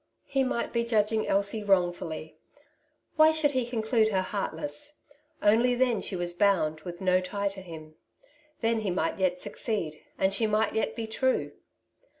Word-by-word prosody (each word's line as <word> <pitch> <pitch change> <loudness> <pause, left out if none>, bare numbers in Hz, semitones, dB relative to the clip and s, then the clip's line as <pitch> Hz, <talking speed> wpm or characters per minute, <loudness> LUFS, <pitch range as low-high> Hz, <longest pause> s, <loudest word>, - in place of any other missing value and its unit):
He 270 -1 +1
might 255 -2 -2
be 235 -1 +1
judging 220 -1 +1
Elsie 200 +2 +1
wrongfully; 175 -5 0 0.8
why 310 0 +7
should 315 -2 +2
he 255 -3 -1
conclude 225 -1 +1
her 190 -3 +1
heartless? 290 +9 -4 0.4
only 235 +4 +4
then 245 -4 +2
she 195 - -4
was 175 -1 -2
bound 175 -5 +2
with 175 +2 -8
no 185 -1 +3
tie 200 +2 -2
to 195 0 -9
him. 160 -3 -10 0.7
Then 230 -1 +1
he 215 -3 -2
might 175 0 -1
yet 180 -1 +1
succeed, 175 -8 -3 0.2
and 190 0 +2
she 220 +2 +2
might 215 0 +1
yet 220 - -1
be 230 - -3
true. 260 +4 0
210 Hz, 160 wpm, -28 LUFS, 185-235 Hz, 0.8 s, why